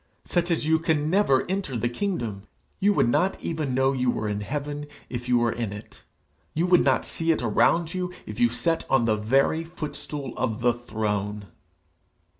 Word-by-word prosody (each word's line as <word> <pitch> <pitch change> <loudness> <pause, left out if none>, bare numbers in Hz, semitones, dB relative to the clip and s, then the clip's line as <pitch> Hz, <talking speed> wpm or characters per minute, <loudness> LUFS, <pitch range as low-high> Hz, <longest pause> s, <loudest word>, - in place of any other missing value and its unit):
Such 175 0 0
as 165 -3 0
you 160 +1 +3
can 155 -1 0
never 185 -9 +3
enter 185 -9 -2
the 115 - 0
kingdom. 120 - -3 0.3
You 205 +2 +4
would - - +3
not 180 +11 +1
even 155 -6 -2
know 135 +1 +3
you 125 -1 +1
were 110 -3 -1
in 105 0 -2
heaven 145 +5 -4 0.2
if 125 0 -4
you 125 - +5
were 120 -1 +2
in 115 -4 -3
it; 105 +1 -11 0.5
you 165 +3 +2
would 180 -1 +5
not - - +2
see 165 0 0
it 155 - 0
around 160 +9 +2
you 180 -1 -2
if 105 0 -7
you 120 - +5
sat 140 +8 0
on 135 -3 +3
the 110 -2 +3
very 135 +9 +2
footstool 150 -5 -6
of 115 -2 -1
the 120 0 +4
throne.' 105 -4 -3
135 Hz, 190 wpm, -25 LUFS, 115-165 Hz, 0.5 s, you